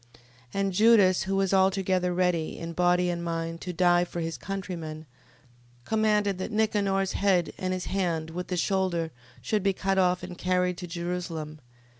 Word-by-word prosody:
15:30. - - -22 0.4
And 195 -1 0
Judas, 205 -3 +5
who 195 +1 -1
was 195 0 +1
altogether 190 -1 +2
ready, 175 -3 0
in 165 0 -6
body 180 0 +2
and 170 0 -4
mind, 165 0 -3
to 180 - -4
die 175 0 +3
for 175 -1 -5
his 165 -1 -3
countrymen, 170 -5 -6 0.8
commanded 210 -1 +1
that 190 - -4
Nicanor's 200 -3 +1
head, 190 -4 +1
and 185 0 -2
his 185 -1 -3
hand, 170 -4 -1
with 180 +2 -5
the 180 - -2
shoulder, 175 -3 0 0.3
should 215 -1 0
be 195 0 +2
cut 195 +1 0
off, 180 0 +2
and 180 - -7
carried 180 0 +1
to 180 - -6
Jerusalem. 170 -3 -4
180 Hz, 170 wpm, -27 LUFS, 170-195 Hz, 0.8 s, Judas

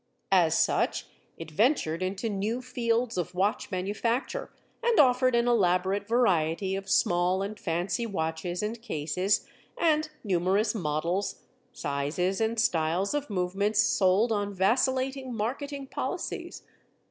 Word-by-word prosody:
As - - +4
such - - +1 0.3
it 165 -1 -8
ventured 185 - +1
into 190 +4 -2
new 210 +3 -1
fields 235 -3 -1
of 180 +1 -4
watch 195 +3 0
manufacture 210 +6 -2 0.3
and 475 -2 +2
offered 255 -2 +4
an 235 0 +2
elaborate 195 -2 +2
variety 190 -5 +1
of 195 0 -6
small 180 +1 +2
and 205 +1 -6
fancy 180 +7 -1
watches 175 -1 -3
and 220 +2 -3
cases, 180 -1 -1 0.3
and 310 -2 +2
numerous 195 +2 +1
models, 175 +1 -2 0.3
sizes, 150 +8 -2
and 225 +1 0
styles 175 - +1
of 290 -2 -2
movements 200 +2 0
sold 210 +1 +3
on 205 -2 -1
vacillating 260 +5 +1
marketing 275 +6 -3
policies. - - -5
200 Hz, 125 wpm, -28 LUFS, 180-235 Hz, 0.3 s, As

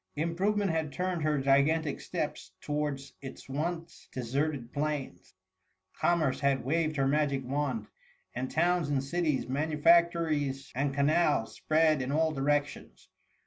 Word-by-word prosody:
Improvement 190 +5 0
had 160 -2 -1
turned 180 +3 -2
her 150 -1 +1
gigantic 140 +3 +2
steps - - -4
to - - -7
wards 145 -2 -2
its 135 - -9
once 165 +4 -4
deserted 130 0 -2
plains; 145 -13 -4 0.6
Commerce 160 -6 +1
had 140 -3 +1
waved 155 +2 0
her 135 -1 +1
magic 140 -2 +1
wand; 130 -5 -2 0.5
and 130 +1 -3
towns 175 -1 +1
and 140 -2 0
cities, 155 -2 -1
manufactories 155 -1 +2
and 140 +2 0
canals, 145 -2 +2
spread 155 -2 +2
in 130 +1 -3
all 160 +2 +2
directions. 145 0 -2
150 Hz, 130 wpm, -30 LUFS, 135-160 Hz, 0.6 s, gigantic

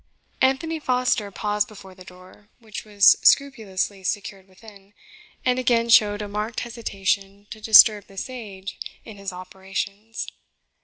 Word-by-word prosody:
Anthony 310 +5 +1
Foster 250 -6 0
paused 210 +2 -2
before 195 -4 -13
the 185 0 -14
door, 185 +3 -17
which 220 -3 -9
was 205 -2 +6
scrupulously 210 -8 +1
secured 195 0 -4
within, 200 +1 -17 0.5
and 250 0 +2
again 235 -2 +1
showed 210 -2 +4
a - - -6
marked 210 +3 -4
hesitation 200 -4 -3
to 220 - -9
disturb 215 -1 +7
the 195 - -17
sage 200 -5 -7 0.3
in 215 -2 -11
his 200 -1 -6
operations. 195 +4 -6
205 Hz, 135 wpm, -23 LUFS, 195-230 Hz, 0.5 s, disturb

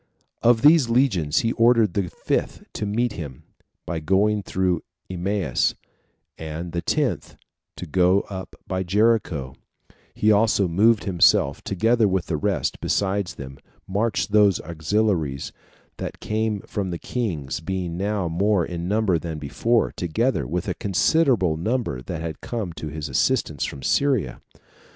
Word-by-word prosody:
Of 120 -1 +4
these 150 -4 +6
legions 110 - +2
he 115 - 0
ordered 115 -5 +3
the 95 -3 -1
fifth - - -2
to 105 - -3
meet 115 +2 0
him, 70 -9 -8 0.4
by 85 -2 -3
going 100 +6 +2
through 95 -3 0 0.3
Emmaus, 95 +1 0 0.6
and 80 +2 -5
the 85 0 -2
tenth - - -1 0.4
to - - -6
go 90 +3 +3
up 95 -2 -8
by 95 -1 -2
Jericho; 95 - +1 0.6
he 110 - +3
also 105 -2 +3
moved 105 +6 +3
himself, 85 -6 +3
together 110 +3 +2
with 95 -2 0
the 80 - -2
rest; 75 - -1
besides 95 -4 -1
whom, 70 -2 -9 0.3
marched 105 +2 -1
those 105 -3 +4
auxiliaries 80 -3 -1 0.5
that - - -6
came 110 -1 -1
from 100 -2 -4
the 85 - -3
kings, 80 - -3
being 90 0 -3
now 100 0 -1
more 95 +2 +1
in 85 -1 -5
number 100 -4 +1
than 80 -2 -5
before, 110 +11 0
together 90 - -1
with 85 +4 -3
a - - 0
considerable 100 - +2
number 105 - -2
that 80 +2 -5
came 110 -8 -4
to 80 - -7
his 75 0 -5
assistance 75 - 0
from 70 -2 -7
Syria. 135 - +1
95 Hz, 140 wpm, -23 LUFS, 80-110 Hz, 0.6 s, these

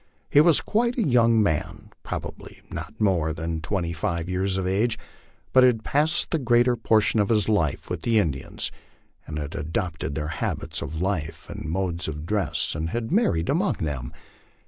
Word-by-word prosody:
He 145 - +7
was 165 -1 +5
quite 235 +3 0
a 235 - +2
young 115 -3 +4
man, 80 -7 -2
probably - - -7
not - - -7
more 85 -7 +2
than 80 0 -3
twenty 85 0 -2
five 85 +1 -2
years 95 +1 0
of 95 - -1
age, 105 +5 +1 0.6
but 130 - +7
had 120 -3 +4
passed 155 +4 +1
the 165 - +1
greater 120 -1 +3
portion 110 -1 +2
of 100 - +2
his 105 -3 +3
life 85 -10 +1
with 90 -3 -4
the 115 +3 +2
Indians, 75 -10 -1 0.6
had 75 -1 -4
adopted 80 -1 -3
their 75 -1 -2
habits 80 - -3
of 80 - -5
life 90 -4 -2
and 80 - -6
modes 90 0 -2
of 75 0 -5
dress, 105 +1 0
and 80 +2 -3
had 115 - -3
married 165 - +2
among - - +2
them. 70 -4 -4
95 Hz, 170 wpm, -25 LUFS, 80-115 Hz, 0.6 s, He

